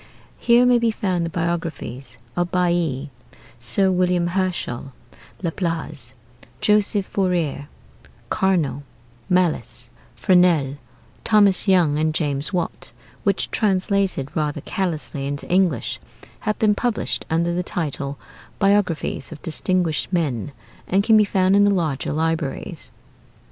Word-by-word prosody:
Here 240 +1 +5
may 250 -1 +5
be 235 -1 +2
found 185 -6 -1
the - - -4
biographies 165 -7 -4 0.2
of 175 0 -1
Bailly, 170 -6 0 0.5
Sir 190 - +1
William 180 -1 +2
Herschel, 175 -9 -2 0.5
Laplace, 160 -7 -3 0.4
Joseph 210 -1 +2
Fourier, 170 -8 -1 0.6
Carnot, 170 -10 +1 0.5
Malus, 180 -9 0 0.2
Fresnel, 170 -7 +3 0.5
Thomas 205 -3 +4
Young, 170 -6 +4
and 155 0 0
James 145 -1 -1
Watt; 175 -3 -3 0.3
which, - - 0
translated 195 - 0
rather 150 -2 -1
carelessly 155 -6 -3
into 145 0 -4
English, 180 -9 +1 0.4
have 215 - -2
been 215 -1 +3
published 235 +1 -1
under 170 +1 +1
the 180 - 0
title 145 -5 -3 0.4
'Biographies 195 -7 +1
of 155 - -8
Distinguished 170 0 -1
Men,' 145 - -1 0.4
and 195 +2 +2
can 220 +1 +5
be 215 - +7
found 190 -1 +2
in 205 - +6
the 205 - +5
larger 165 -8 0
libraries. 160 -2 -2
175 Hz, 115 wpm, -22 LUFS, 150-190 Hz, 0.6 s, be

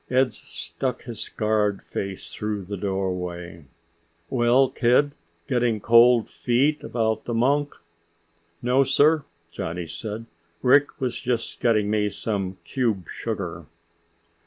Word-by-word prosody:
Ed 130 -2 +3
stuck 125 +3 -5
his 115 -3 -7
scarred 105 -2 0
face 95 -1 -5
through 105 -2 -3
the 100 +3 -4
doorway. 90 -4 -3 0.7
"Well, 125 +2 +4
kid, 125 +4 +3 0.4
getting 120 -4 +1
cold 115 +1 +6
feet 140 +5 +1
about 110 -2 -1
the 120 - -2
monk?" 145 +5 +2 0.9
"No, 125 +3 +4
sir!" 145 +3 +3 0.3
Johnny 85 +1 -4
said. 105 +7 -5 0.4
"Rick 140 +3 +4
was 125 -2 -2
just 125 -3 -2
getting 105 -3 +2
me 105 -1 +2
some 95 -3 -3
cube 110 - -1
sugar." - - -4
115 Hz, 115 wpm, -24 LUFS, 100-125 Hz, 0.9 s, cold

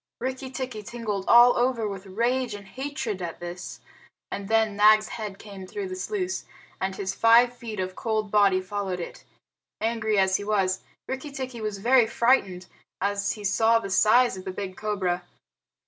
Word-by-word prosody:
Rikki 260 +1 -4
tikki 255 -4 -5
tingled 210 -3 -4
all 240 +1 +7
over 240 -3 +1
with 195 -1 -7
rage 235 +3 0
and 200 -1 -10
hatred 255 -4 -4
at 170 -2 -5
this, 175 +1 -7 0.5
and 200 -1 -5
then 220 -1 +2
Nag's 215 +1 +5
head 210 -4 -6
came 195 -3 -10
through 400 - -5
the 370 - -5
sluice, 375 -1 -3 0.4
and 190 0 -2
his 195 -1 -3
five 235 +3 +5
feet 225 -4 -7
of 185 0 -3
cold 215 -2 -2
body 200 -3 +4
followed 190 -1 -3
it. 170 - -8 0.6
Angry 220 -1 0
as 190 -1 +3
he 205 - -6
was, 195 -3 0 0.3
Rikki 265 +3 -4
tikki 260 -4 -6
was 215 -2 -3
very 240 +3 +4
frightened 220 -7 +2 0.3
as 200 0 0
he 210 - -10
saw 225 +3 +3
the 195 -4 -4
size 220 +4 +4
of 185 - -8
the - - -5
big 185 0 -6
cobra. 190 -5 -2
215 Hz, 175 wpm, -26 LUFS, 195-240 Hz, 0.6 s, all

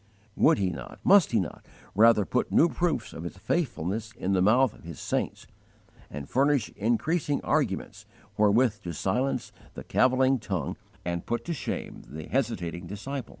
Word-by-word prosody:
Would - - +4
He 95 -3 0
not, - - -8
must 200 -2 +6
He 115 - +3
not, 90 -6 -5 0.3
rather 110 0 +5
put 125 - -1
new 170 - +5
proofs 165 -11 -1
of - - -7
His 85 +2 -7
faithfulness 110 - -2
in 100 -5 -2
the 95 - +3
mouth 115 +4 +4
of - - -18
His 85 -3 -8
saints, - - -2 0.6
and 70 -1 -7
furnish 140 -3 +2
increasing 145 - 0
arguments - - -1 0.3
wherewith 105 +1 +3
to 85 -4 -5
silence 115 - -1 0.2
the - - -7
cavilling 130 +1 +3
tongue 95 -8 -3 0.3
and 85 -1 -3
put 120 - -2
to 170 - -2
shame 130 - -5
the 80 +1 -8
hesitating 90 -9 -2
disciple? 115 +7 -5
110 Hz, 160 wpm, -27 LUFS, 95-130 Hz, 0.6 s, must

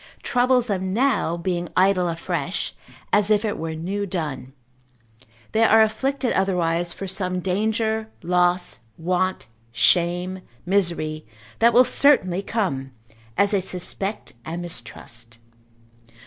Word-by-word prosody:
troubles 250 0 +3
them 190 -3 -2
now 245 -9 +1
being 175 -1 -2
idle 185 -1 +4
afresh, 170 0 -2 0.4
as 205 0 +4
if 215 +1 +3
it 210 - -1
were 160 0 -4
new 190 +6 -3
done; 150 -8 -4 1.0
they 225 - +3
are 220 0 +6
afflicted 265 +4 -1
otherwise 175 -2 +1
for 195 - -6
some 185 -1 -1
danger, 220 +4 -1
loss, 180 -1 +1 0.2
want, 185 +2 -1 0.3
shame, 175 - +2 0.2
misery, 170 -5 0 0.4
that 235 +1 +6
will 245 +2 +6
certainly 195 -13 +3
come, 175 -12 -2 0.5
as 200 +1 +3
they 200 -2 +2
suspect 190 +3 -4
and 170 +4 -5
mistrust. 120 -5 -6
185 Hz, 120 wpm, -23 LUFS, 170-210 Hz, 1.0 s, are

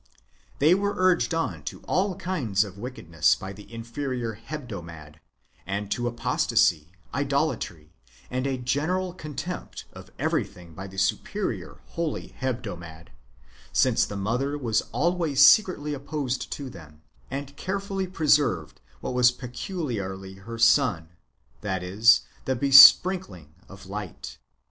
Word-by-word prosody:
They 155 +5 +5
w^ere 200 +2 0
urged 185 -2 +3
on 165 - -2
to - - -6
all 190 +2 0
kinds 150 - 0
of 100 -3 -9
wickedness 85 - 0
by 95 +1 -8
the 105 +3 -14
inferior 115 0 -4
Hebdomad, 100 - -9 0.5
and 100 +1 -3
to 120 0 -1
apostasy, 85 -8 +1 0.2
idolatry, 140 - -2 0.4
and 130 +2 -1
a 135 -1 -1
general 160 +9 -1
contempt 160 +1 -6
for - - -11
everything 85 -2 -3
by 95 +4 -8
the 95 0 -12
superior 100 0 -2
holy 165 -3 -3
Hebdomad,^ 90 -11 -5 0.6
since - - +3
the 100 - -6
mother 125 +8 -1
was 115 -6 +1
always 165 -4 +3
secretly 165 -8 +4
opposed 140 -2 -3
to 140 -3 -5
them, 75 -3 -14 0.3
and 140 +1 -6
carefully 195 0 -3
preserved 145 - +1 0.2
what - - -4
w^as 125 0 +4
peculiarly 120 - -5
her 110 +5 -9 0.2
own, 85 - -3 0.5
that 95 -3 -2
is, 110 +6 +5 0.2
the 130 - 0
besprink 140 +8 +8
ling 80 -5 -14 0.2
of 95 0 -12
light. 100 -1 -7
125 Hz, 125 wpm, -26 LUFS, 95-150 Hz, 0.6 s, besprink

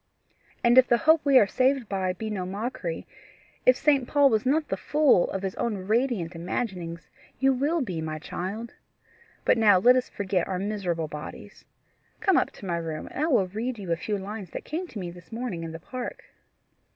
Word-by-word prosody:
"And 240 +2 +7
if 255 - +5
the 240 - +4
hope 315 +3 +4
we 280 -2 +5
are 215 - +7
saved 255 +3 +1
by 190 -2 -1
be 215 +4 -5
no 195 -3 -2
mockery, 195 -3 -4 0.6
if 255 0 +7
St. 280 -5 +2
Paul 285 -1 +4
was 220 +2 +1
not 300 +3 +2
the - - 0
fool 295 -11 +3
of 195 - -4
his 190 -1 -2
own 235 -3 -1
radiant 220 -6 0
imaginings, 170 -2 -4 0.3
you 270 0 +3
will 295 +6 0
be, 185 -10 -3
my 155 -1 -4
child. 200 +9 -5 0.7
But - - +4
now 210 -4 +6
let 245 +7 +6
us 255 0 0
forget 190 -3 -1
our 185 - -2
miserable 185 -5 -2
bodies. 150 0 -9 0.5
Come 390 -5 +3
up - - +3
to - - -11
my 170 -2 -1
room, 160 -2 -5
and 290 - -2
I - - 0
will 245 - +3
read 225 +6 -4
you 190 -4 -5
a - - +3
few 205 +5 -3
lines 200 -1 -6
that - - -6
came 345 +5 -4
to 235 - -10
me 180 -3 -4
this 175 +3 -15
morning 225 -7 -4
in 165 - -5
the 165 - -7
park." 250 +8 -6
210 Hz, 205 wpm, -26 LUFS, 180-255 Hz, 0.7 s, And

